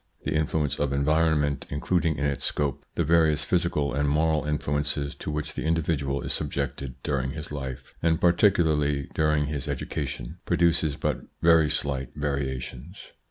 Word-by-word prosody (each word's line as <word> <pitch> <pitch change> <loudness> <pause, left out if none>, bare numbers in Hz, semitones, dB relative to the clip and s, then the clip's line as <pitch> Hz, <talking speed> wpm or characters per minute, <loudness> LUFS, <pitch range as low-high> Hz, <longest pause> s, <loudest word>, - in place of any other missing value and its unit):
The - - -1
influence 75 -2 0
of 70 -1 0
en 70 0 +1
vironment, 75 -2 +2
including 80 +2 0
in 70 - -1
its 70 -1 -1
scope 70 -4 -1
the 85 - +1
various 80 -1 +3
physical 70 -3 0
and 70 +1 +1
moral 80 +1 +2
influences 75 -1 -1
to - - -7
which 75 0 -3
the - - -4
individual 75 -4 0
is - - 0
sub - - -1
jected 65 -2 -3
during 65 -2 -1
his 75 -2 -7
life, 65 -2 -6
and 80 0 +2
particularly 80 -6 +3
during 75 -1 +2
his 75 0 -4
r - - 0
education, 65 -2 -5
produces 85 -3 +2
but - - -2 0.2
very 80 -2 +6
slight 70 -3 0
variations. 70 +2 -4
75 Hz, 160 wpm, -26 LUFS, 70-80 Hz, 0.2 s, very